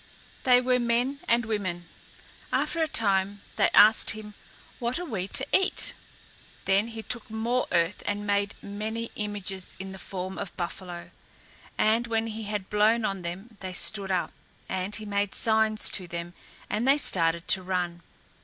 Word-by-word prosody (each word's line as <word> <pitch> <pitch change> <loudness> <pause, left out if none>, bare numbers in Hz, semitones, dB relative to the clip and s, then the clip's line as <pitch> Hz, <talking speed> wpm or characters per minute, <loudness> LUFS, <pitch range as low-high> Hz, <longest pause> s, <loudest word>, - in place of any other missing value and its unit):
They 250 -1 +7
were 250 0 +2
men 245 +4 +1
and 235 0 +3
women. 185 -6 -2 0.7
After 335 - +1
a 320 - +3
time 200 -5 +1
they - - +4
asked 215 +2 +7
him, 210 0 -4 0.5
"What 240 +1 -1
are 355 - -4
we 195 - -3
to 265 - -1
eat?" 380 - +4 0.7
Then 195 +3 +3
he 225 -1 -7
took 240 0 -3
more 230 +3 0
earth 170 +2 +1
and 205 0 -1
made 200 0 +1
many 220 +3 -4
images 205 -3 -3
in 190 +1 -6
the 190 - -8
form 185 +1 -5
of 200 -3 -6
buffalo, 175 0 -5 0.7
and 225 +2 +3
when 225 -1 +1
he 220 -1 -5
had 205 -2 -3
blown 215 +2 +3
on 195 -2 -1
them 190 +6 -7
they 185 -1 -5
stood 200 +1 +1
up, 185 -2 0 0.4
and 190 +2 -1
he 215 - -4
made 200 -1 -1
signs 220 -1 +2
to 185 -3 0
them 170 0 -5 0.3
and 220 +5 -1
they 275 +2 +6
started 170 - +1
to 190 - +4
run. 180 -2 -2
205 Hz, 165 wpm, -27 LUFS, 190-225 Hz, 0.7 s, They